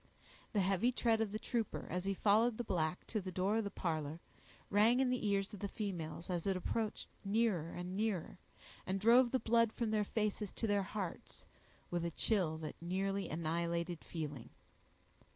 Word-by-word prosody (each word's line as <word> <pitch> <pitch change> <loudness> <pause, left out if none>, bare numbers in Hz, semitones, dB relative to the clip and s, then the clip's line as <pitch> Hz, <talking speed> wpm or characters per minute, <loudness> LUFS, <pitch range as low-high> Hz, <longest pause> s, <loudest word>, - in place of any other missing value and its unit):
The 205 - +3
heavy 195 +6 +3
tread 230 -2 +2
of 215 -3 0
the 215 - -2
trooper, 230 -1 -2
as 180 +1 -1
he 195 0 0
followed 215 +4 +4
the 240 - -2
black 170 -5 -1
to 215 - -2
the 185 0 -5
door 190 +4 +1
of 225 - +1
the 200 - -2
parlor, 160 -4 -2 0.5
rang 220 +5 +5
in 260 -1 +3
the 250 -4 0
ears 200 0 +1
of 205 - -7
the 200 - -2
females 175 -6 -4
as 175 0 -2
it 190 -1 +2
approached 215 +4 -2 0.2
nearer 200 -5 +1
and 180 +2 -5
nearer, 205 -4 -1 0.5
and 190 +1 0
drove 240 +4 +6
the 260 - +2
blood 230 -1 +3
from 225 -1 -1
their 215 -1 +2
faces 210 -1 -1
to - - -2
their 205 -2 +2
hearts, 195 -2 -5 0.5
with 175 -1 0
a 170 - 0
chill 170 -2 +1
that 160 0 -7
nearly 195 +3 -1
annihilated 170 +1 -1
feeling. 150 -7 -5
195 Hz, 185 wpm, -36 LUFS, 175-220 Hz, 0.5 s, drove